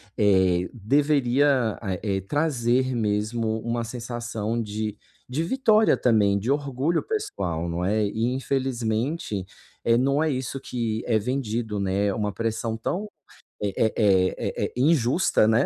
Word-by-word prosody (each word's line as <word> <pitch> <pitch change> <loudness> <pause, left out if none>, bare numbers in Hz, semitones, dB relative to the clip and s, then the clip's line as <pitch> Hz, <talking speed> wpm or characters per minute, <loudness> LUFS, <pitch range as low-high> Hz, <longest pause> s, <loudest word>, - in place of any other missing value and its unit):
Eh, 95 -3 +3
deveria 135 0 +2
a 95 -4 -2
eh, 100 -2 0
trazer 130 - +1
mesmo 110 +1 0
uma 115 0 -2
sensação 115 -1 -3
de 105 -1 -3 0.3
de 130 +5 -2
vitória 220 +1 +3
também, 105 -4 +3
de 110 +7 -1
orgulho 140 +3 0
pessoal, 405 - -3
não 85 +1 -2
é? 105 +3 +1
E, 110 +4 -1
infelizmente, 130 - -1 0.4
eh, 115 0 +4
não 140 +4 +2
é 160 - +1
isso 130 -1 -3
que 115 -4 -3
é 115 -2 +3
vendido, 110 -2 -2
né. 100 +1 0
Uma 105 -1 -1
pressão 115 +1 -2
tão 190 - -3 0.5
eh 100 -2 -2
eh 110 - +2
eh 95 -4 +3
eh - - -3
eh - - -6
injusta, 135 - +3
né, 115 +5 +3
115 Hz, 140 wpm, -25 LUFS, 105-135 Hz, 0.5 s, eh